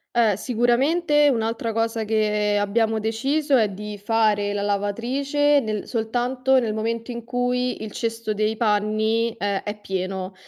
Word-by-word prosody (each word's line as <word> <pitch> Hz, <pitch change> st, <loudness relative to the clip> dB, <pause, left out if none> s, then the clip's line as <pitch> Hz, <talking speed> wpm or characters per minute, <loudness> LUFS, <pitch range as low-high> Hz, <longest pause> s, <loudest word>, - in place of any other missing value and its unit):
Eh, 220 Hz, -4 st, +4 dB
sicuramente 280 Hz, -, +2 dB
un'altra 225 Hz, -1 st, -1 dB
cosa 225 Hz, 0 st, -1 dB
che 210 Hz, -1 st, +1 dB
abbiamo 220 Hz, +2 st, +1 dB
deciso 270 Hz, +7 st, 0 dB
è 220 Hz, -4 st, +3 dB
di 210 Hz, +1 st, -7 dB
fare 205 Hz, -1 st, +1 dB
la 205 Hz, -, -2 dB
lavatrice 255 Hz, +9 st, +1 dB
nel 215 Hz, -3 st, -4 dB
soltanto 250 Hz, +3 st, +1 dB
nel 220 Hz, -3 st, -1 dB
momento 230 Hz, +2 st, -3 dB
in 235 Hz, -1 st, -6 dB
cui 245 Hz, 0 st, -1 dB
il 215 Hz, -2 st, -6 dB
cesto 230 Hz, -1 st, -3 dB
dei 215 Hz, +1 st, -1 dB
panni 220 Hz, +1 st, +1 dB
è 200 Hz, -2 st, -1 dB
è 210 Hz, 0 st, -5 dB
pieno. 190 Hz, -1 st, -4 dB
225 Hz, 145 wpm, -23 LUFS, 210-245 Hz, -, Eh